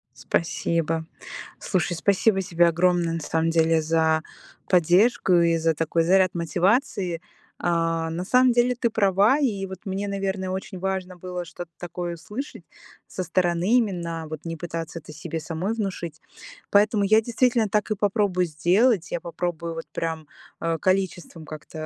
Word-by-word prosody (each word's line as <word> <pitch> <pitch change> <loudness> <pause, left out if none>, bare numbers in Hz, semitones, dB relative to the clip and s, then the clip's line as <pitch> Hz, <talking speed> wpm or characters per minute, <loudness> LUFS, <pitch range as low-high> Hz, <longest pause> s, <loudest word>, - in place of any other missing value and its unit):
Спасибо. 165 +3 -1 0.5
Слушай, 180 -2 -1
спасибо 195 +3 +2
тебе 175 -2 +3
огромное 170 0 +2
на 165 - -2
самом 160 +2 0
деле 165 -1 +3
за 160 0 +2 0.5
поддержку 185 +4 +4
и 170 -1 +4
за 165 0 +1
такой 165 +1 0
заряд 185 +1 +3
мотивации. 180 - 0 0.4
А, 165 -1 0
на 170 +2 -3
самом 255 +4 +4
деле 240 +1 +2
ты 240 -1 0
права, 205 +4 +3
и 210 -9 0
вот 190 -1 -8
мне, 195 +1 -3
наверное, 195 -1 -2
очень 190 0 -5
важно 190 -1 -3
было 180 0 -5
что-то 175 0 -9
такое 175 0 -5
услышать 210 - -7 0.4
со 185 - -4
стороны 180 +5 +2
именно, 170 -8 -2
вот 155 -2 -7
не 165 0 -4
пытаться 165 0 -5
это 155 - -12
себе 160 +1 -5
самой 165 +7 -3
внушить, 185 -7 -4 0.5
поэтому 210 +1 +4
я 215 +3 +5
действительно 235 -1 +1
так 210 +1 0
и - - +2
попробую 200 -3 +1
сделать, 180 +7 +2
я 170 - -2
попробую 170 -1 -4
вот 165 - -6
прям, 160 -2 -3 0.3
а, 165 0 -1
количеством 185 -4 -1
как-то 155 +1 -8
175 Hz, 150 wpm, -24 LUFS, 165-200 Hz, 0.5 s, я